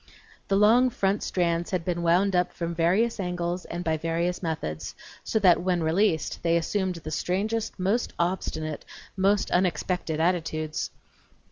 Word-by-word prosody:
The 195 - +1
long 225 +5 +5
front 200 -3 0
strands 170 -1 0
had 180 -3 -2
been 175 -1 -1
wound 180 +3 +3
up 180 0 +1
from 170 -1 -3
various 190 +8 +2
angles 180 -1 -2
and 175 +1 -5
by 160 -2 0
various 165 +2 -1
methods, 155 - -4 0.3
so - - -1
that, 185 -5 +5
when 180 -2 0
released, 160 +1 +1
they 170 0 +2
assumed 185 +2 -1
the 155 -2 -7
strangest, 210 +8 -1
most 200 +6 0
obstinate, 160 -3 -2 0.3
most 200 +1 +2
unexpected 180 -2 0
attitudes. 160 -2 -1
180 Hz, 145 wpm, -26 LUFS, 165-195 Hz, 0.3 s, long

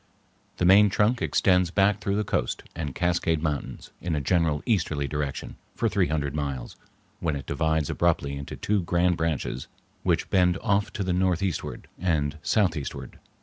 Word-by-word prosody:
The 90 - +1
main 100 +3 +7
trunk 105 +5 +2
extends 90 -2 +3
back 100 +3 +2
through 100 -1 0
the 105 - +1
Coast - - -1
and 75 -5 -4
Cascade 85 -2 +1
Mountains 75 -3 -3
in 85 -2 -1
a - - 0
general 80 0 +1
easterly 80 -10 0
direction 75 -1 -4 0.2
for - - +1
three - - +2
hundred 70 -2 -1
miles, 70 -5 -4 0.4
when 80 -3 -1
it 70 - -5
divides 80 0 0
abruptly 80 -5 +1
into 70 0 -6
two 105 -1 0
grand 90 +1 +2
branches 80 -6 -2 0.3
which - - 0
bend 90 -1 +3
off 100 -1 +1
to 100 - -2
the 95 -1 0
northeastward 90 0 -1
and 80 -4 0
southeastward. 90 - -1
85 Hz, 160 wpm, -26 LUFS, 75-95 Hz, 0.4 s, main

